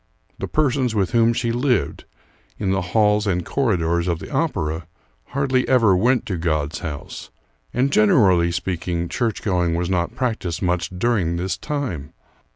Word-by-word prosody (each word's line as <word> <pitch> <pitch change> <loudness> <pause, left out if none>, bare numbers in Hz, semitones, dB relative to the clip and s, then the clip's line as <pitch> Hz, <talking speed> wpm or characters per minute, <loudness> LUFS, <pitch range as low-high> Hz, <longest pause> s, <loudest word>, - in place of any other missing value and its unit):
The - - -3
persons 130 -5 +1
with 95 -4 +1
whom 115 0 +4
she 115 0 -1
lived, 125 +1 0 0.5
in 95 -3 -1
the 95 0 +1
halls 105 +3 +2
and 90 -3 0
corridors 85 -9 0
of 85 -2 0
the - - -10
opera, 80 +2 -1 0.4
hardly 135 -2 0
ever 115 -7 +5
went 120 +6 +2
to 95 - -3
God's 75 -2 -1
house; 75 -5 -7 0.4
and 130 +3 +1
generally 95 -5 +4
speaking, 85 -1 -2
church 115 -2 -2
going 90 -5 +1
was 85 +2 -1
not 90 +5 -1
practiced 110 -10 -2
much 90 -1 0
during 95 -3 0
this 90 +1 -2
time. 130 - -4
95 Hz, 155 wpm, -22 LUFS, 85-120 Hz, 0.5 s, ever